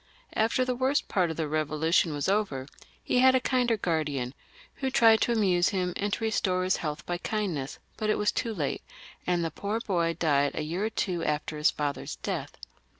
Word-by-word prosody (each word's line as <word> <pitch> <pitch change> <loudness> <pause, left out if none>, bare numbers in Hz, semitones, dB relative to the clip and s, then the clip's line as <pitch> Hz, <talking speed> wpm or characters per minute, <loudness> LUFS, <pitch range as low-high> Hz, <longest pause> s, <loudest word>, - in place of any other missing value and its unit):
After 230 +4 +2
the 250 - 0
worst 260 +3 +1
part 180 -3 +1
of 160 - -5
the 165 - 0
Eevolution 155 +2 +1
was 145 -1 -2
over, 195 -10 0 0.4
he 250 - +1
had 260 0 +6
a - - +5
kinder 250 -3 +1
guardian, 150 -9 -1 0.4
who 265 - -1
tried 225 -4 +5
to - - +2
amuse 185 -6 +3
him 180 -2 -1
and 205 +1 -1
to - - 0
bring 220 0 0
back 185 -2 +1
his 185 0 +2
health 150 -1 -4
by 175 0 -3
kindness, 175 -12 -2 0.2
but 215 -1 -1
it - - +2
was 210 0 +2
too 230 -3 -2
late, 150 -6 -2 0.5
and 175 -2 +1
the 165 - -2
poor 205 +7 -2
boy 170 -6 0
died 145 -3 +2
a - - -2
year 175 +7 -2
or - - 0
two 180 -6 -2
after 150 0 -1
his 150 0 +3
father's 145 -1 -3
d^th. - - -2
180 Hz, 210 wpm, -28 LUFS, 155-220 Hz, 0.5 s, had